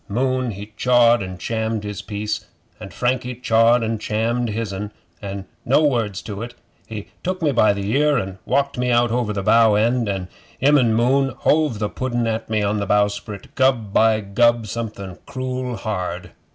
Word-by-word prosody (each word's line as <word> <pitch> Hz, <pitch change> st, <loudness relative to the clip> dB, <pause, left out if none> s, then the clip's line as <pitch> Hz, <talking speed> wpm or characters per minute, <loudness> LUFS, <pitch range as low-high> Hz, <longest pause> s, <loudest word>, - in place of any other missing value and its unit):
Moon 130 Hz, +3 st, 0 dB
he 105 Hz, 0 st, -8 dB
chawed 120 Hz, -2 st, +4 dB
and 95 Hz, -1 st, -6 dB
chammed 110 Hz, +2 st, -2 dB
his 105 Hz, -2 st, -5 dB
piece, 105 Hz, 0 st, -4 dB, 0.3 s
and 95 Hz, -, -9 dB
Frankie 125 Hz, 0 st, -1 dB
chawed 115 Hz, 0 st, +3 dB
and 110 Hz, -1 st, -2 dB
chammed 115 Hz, +3 st, -1 dB
his'n, 105 Hz, -2 st, -4 dB, 0.3 s
and 100 Hz, -1 st, -6 dB, 0.2 s
no 140 Hz, +5 st, +3 dB
words 115 Hz, -, 0 dB
to 105 Hz, -1 st, -6 dB
it 120 Hz, +1 st, -7 dB, 0.3 s
he 105 Hz, -2 st, -7 dB
took 185 Hz, +1 st, -2 dB
me 155 Hz, -4 st, +1 dB
by 115 Hz, -5 st, +4 dB
the 100 Hz, -1 st, -3 dB
ear 150 Hz, 0 st, +3 dB
an' 95 Hz, -3 st, -4 dB
walked 140 Hz, -2 st, 0 dB
me 125 Hz, 0 st, 0 dB
out 120 Hz, -1 st, +3 dB
over 120 Hz, -2 st, 0 dB
the 100 Hz, -2 st, -3 dB
bow 115 Hz, 0 st, +5 dB
end, 115 Hz, +1 st, +1 dB
an' 95 Hz, -2 st, -3 dB, 0.3 s
him 145 Hz, +3 st, +4 dB
an' 115 Hz, -3 st, +2 dB
Moon 135 Hz, +4 st, +3 dB
hove 150 Hz, -7 st, +2 dB
the 105 Hz, 0 st, -1 dB
pudden 120 Hz, +1 st, -2 dB
at 115 Hz, 0 st, -2 dB
me 110 Hz, -1 st, 0 dB
on 105 Hz, +1 st, 0 dB
the 100 Hz, -, -3 dB
bowsprit 105 Hz, 0 st, -1 dB
gub 120 Hz, -6 st, +1 dB
by 110 Hz, -1 st, +4 dB
gub, 120 Hz, +3 st, +2 dB
something 105 Hz, -4 st, -6 dB
cruel 130 Hz, -1 st, -4 dB
hard! 95 Hz, -4 st, -4 dB
115 Hz, 180 wpm, -21 LUFS, 105-125 Hz, 0.3 s, bow